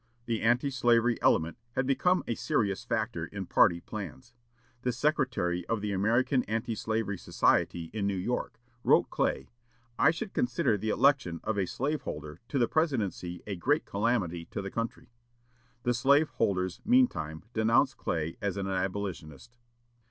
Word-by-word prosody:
The 115 -2 -1
anti 120 +5 +2
slavery 120 -2 +2
element 80 +5 +2
had 130 - 0
become 175 +8 +2
a - - -1
serious 100 -3 -1
factor - - -2
in - - -6
party 85 0 +4
plans. 95 -12 -8 0.5
The 125 - 0
secretary 125 - 0
of 115 - 0
the 105 -1 -2
American 120 +7 +2
Anti 115 +2 -2
Slavery 110 -3 -2
Society 85 -2 +1
in 105 -2 -1
New 100 - 0
York 120 +7 -3 0.2
wrote - - +4
Clay: 65 - -1 0.5
"I - - +6
should 170 +5 -3
consider 120 -3 +1
the 110 +2 -3
election 120 -10 +2
of 110 - -1
a 95 -2 0
slave 145 - -2
holder 75 +2 -7
to 140 - -2
the 120 -3 +3
presidency 110 - -1
a 100 - -4
great 145 - +1
calamity 100 -6 -1
to 100 - -5
the 95 - -5
country." 115 0 -4 0.7
The 125 - +2
slave 140 +5 +4
holders 95 -5 -1
meantime 210 - +2
denounced 115 +4 +3
Clay 80 -1 -2
as 100 -1 -2
an 100 - -2
abolitionist. 95 - -4
110 Hz, 155 wpm, -29 LUFS, 95-125 Hz, 0.7 s, I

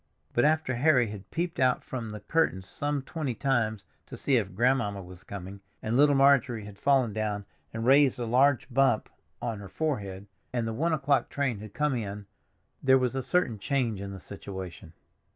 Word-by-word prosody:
But 120 - +3
after 155 -3 +2
Harry 125 -3 +3
had 100 -2 -9
peeped 170 +1 -3
out 130 -1 +3
from 120 -4 -5
the 105 -1 -7
curtains 100 - 0
some 145 +2 -2
twenty 140 -4 -3
times 110 -5 0 0.2
to - - -8
see 135 -3 +2
if 100 -5 -2
grandmamma 110 -4 +1
was 90 +1 -13
coming, 100 0 -8 0.2
and 110 +2 -1
little 145 +2 +5
Marjorie 135 -5 +4
had 100 -1 -11
fallen 130 -6 +3
down 105 -2 -2 0.3
and 115 0 -4
raised 135 0 +5
a 120 - -1
large 130 +2 +3
bump 135 -4 +3 0.3
on 115 -3 -2
her 100 -2 -9
forehead, 100 -10 -3 0.3
and 120 -2 -1
the 115 - -2
one 165 +9 0
o'clock 145 -3 +1
train 135 -7 -1
had 105 -1 -10
come 150 -1 +1
in, 105 -4 -4 0.6
there 130 0 +5
was 125 -1 0
a 135 - -1
certain 130 - 0
change 115 -4 -1
in 100 0 -5
the 95 - -7
situation. 95 -3 -8
120 Hz, 190 wpm, -28 LUFS, 100-140 Hz, 0.6 s, little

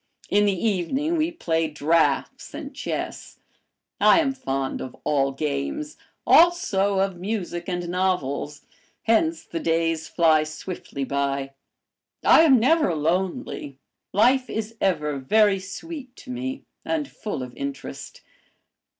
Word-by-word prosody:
In 205 +1 +4
the 200 +2 +1
evening 265 - 0
we 315 0 +1
played 165 - -1
draughts 160 +2 +1
and - - -7
chess. - - -5 0.6
I - - +6
am 275 -4 +1
fond 135 - -3
of 130 - -7
all 135 -2 +1
games, 150 - -3 0.3
also 235 - +4
of 190 -1 0
music 185 -3 -3
and 175 -1 -2
novels, 170 -6 -1 0.4
hence 320 +9 +2
the 165 - -5
days 165 -1 0
fly 160 -2 +4
swiftly 155 -2 -6
by; 140 0 -2 0.7
I - - +7
am 275 -6 +6
never 265 - +3
lonely, 160 -3 -2 0.3
life 255 +5 +3
is 220 +1 -4
ever 150 -6 0
very 205 +8 +3
sweet 255 - -8
to 255 - -10
me 260 +2 -4 0.2
and 310 -3 -1
full 210 - -5
of 125 -1 -9
interest. 140 0 -7
185 Hz, 125 wpm, -24 LUFS, 150-250 Hz, 0.7 s, I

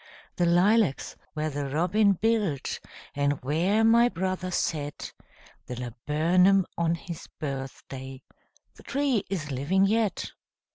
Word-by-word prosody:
The 175 - +2
lilacs 185 -1 +3 0.2
where 155 0 -1
the 140 -1 -3
robin 185 +8 +3
built, 205 - 0 0.3
And 145 0 0
where 175 +10 +2
my 235 +2 +5
brother 185 -1 -2
set 150 -5 -3 0.5
The 125 - -5
laburnum 165 - +2
on 170 0 +1
his 170 -1 -8
birthday, 135 -1 -6 0.5
The - - -17
tree 275 -7 0
is 160 -7 -3
living 155 +9 +2
yet! 215 0 0
170 Hz, 115 wpm, -27 LUFS, 145-195 Hz, 0.5 s, my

